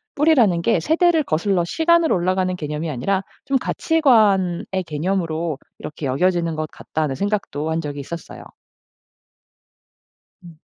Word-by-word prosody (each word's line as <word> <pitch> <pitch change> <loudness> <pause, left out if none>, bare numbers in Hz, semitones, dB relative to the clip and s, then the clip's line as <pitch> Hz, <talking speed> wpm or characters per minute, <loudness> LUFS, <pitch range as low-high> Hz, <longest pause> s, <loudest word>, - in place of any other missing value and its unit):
뿌리라는 245 - +3
게 170 - +2
세대를 325 - +2
거슬러 175 0 0
시간으로 330 - +2
올라가는 185 +1 0
개념이 150 0 -4
아니라 190 +9 -1 0.2
좀 275 - +2
'가치관의 215 - +2 0.2
개념으로 165 -1 -2 0.2
이렇게 150 -1 -7
여겨지는 170 +3 +1
것 155 0 -3
같다.'는 155 -3 -3
생각도 195 -6 -2
한 160 - 0
적이 145 -2 -6
있었어요. 165 +5 -8 2.0
음. 170 -3 -14
175 Hz, 315 characters per minute, -21 LUFS, 155-210 Hz, 2.0 s, 뿌리라는